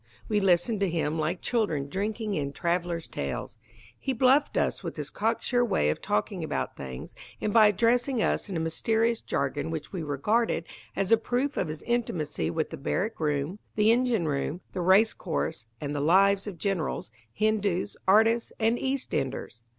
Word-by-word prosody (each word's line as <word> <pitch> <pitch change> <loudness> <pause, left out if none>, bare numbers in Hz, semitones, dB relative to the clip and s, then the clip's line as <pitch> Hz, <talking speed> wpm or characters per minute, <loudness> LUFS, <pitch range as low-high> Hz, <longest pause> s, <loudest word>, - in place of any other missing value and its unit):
We 210 -1 +2
listened 195 +3 +2
to 195 -2 +1
him 160 -1 -1
like 160 +4 -1
children 185 - 0
drinking 210 +5 -2
in 140 -5 -2
travellers' 170 0 -1
tales. 70 +10 -5 0.4
He 265 - -1
bluffed 265 +4 +3
us - - 0
with - - -5
his - - -5
cocksure 230 +3 +1
way 75 - +2
of - - -5
talking - - -1
about - - -3
things, 65 -1 -8 0.3
and 210 - -1
by 220 -2 +8
addressing 235 +5 +2
us 215 - 0
in 185 - -2
a - - -1
mysterious 225 +8 +1
jargon 140 +3 -2
which 160 +2 -5
we 180 - -3
regarded 165 - 0 0.3
as 195 +1 -1
a 225 - +8
proof 250 +5 -1
of - - 0
his 155 0 -6
intimacy 230 -11 -1
with 160 -1 -2
the 160 - -5
barrack 195 +10 -2
room, 150 +4 -1 0.2
the 215 +1 +5
engine 235 -7 +2
room, 145 +4 -2
the 180 - -2
racecourse, 175 - +2
and 145 0 -4
the 145 - -1
lives 195 +6 +4
of 195 -4 -6
generals, 180 -4 -2 0.2
Hindus, 205 - 0
artists, 225 +4 +4
and 225 +2 +2
East 270 0 -2
enders. 125 -3 -3
195 Hz, 175 wpm, -28 LUFS, 155-225 Hz, 0.4 s, by